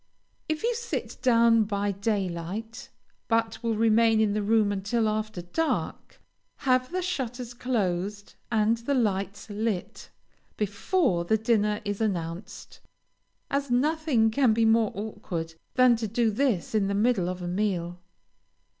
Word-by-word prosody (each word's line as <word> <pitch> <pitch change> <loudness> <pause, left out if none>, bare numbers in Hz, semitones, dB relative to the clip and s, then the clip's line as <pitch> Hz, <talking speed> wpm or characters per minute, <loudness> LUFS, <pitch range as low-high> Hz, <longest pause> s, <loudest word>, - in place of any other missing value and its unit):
If 310 +4 -2
you 480 +1 +2
sit 470 0 -4
down 230 -2 +4
by 205 -1 -1
daylight, 205 +4 -3 0.4
but 225 -1 0
will 230 -2 0
remain 225 0 +4
in 215 -2 +2
the 210 - 0
room 210 0 +2
until 205 +3 0
after 215 -3 -2
dark, 320 - -3 0.5
have 255 +1 +2
the 365 0 -2
shutters 250 -8 -4
closed 205 -5 -2 0.2
and 220 0 +2
the 240 +5 -1
lights 200 -4 -1
lit, 210 -3 -3 0.5
before 210 - 0
the 220 +6 +2
dinner 210 -2 +1
is 205 +1 -3
announced, 185 -1 -4 0.7
as 280 0 -1
nothing 265 -3 +2
can 250 -1 +3
be 225 0 +3
more 225 -1 +3
awkward 180 -5 -5 0.2
than 255 -2 +6
to 225 -1 -3
do 225 +1 +1
this 225 -6 0
in 210 -3 +2
the 200 - -1
middle 205 -4 +2
of 185 0 -4
the 175 - -4
meal. 180 -2 -2
220 Hz, 140 wpm, -27 LUFS, 200-240 Hz, 0.7 s, than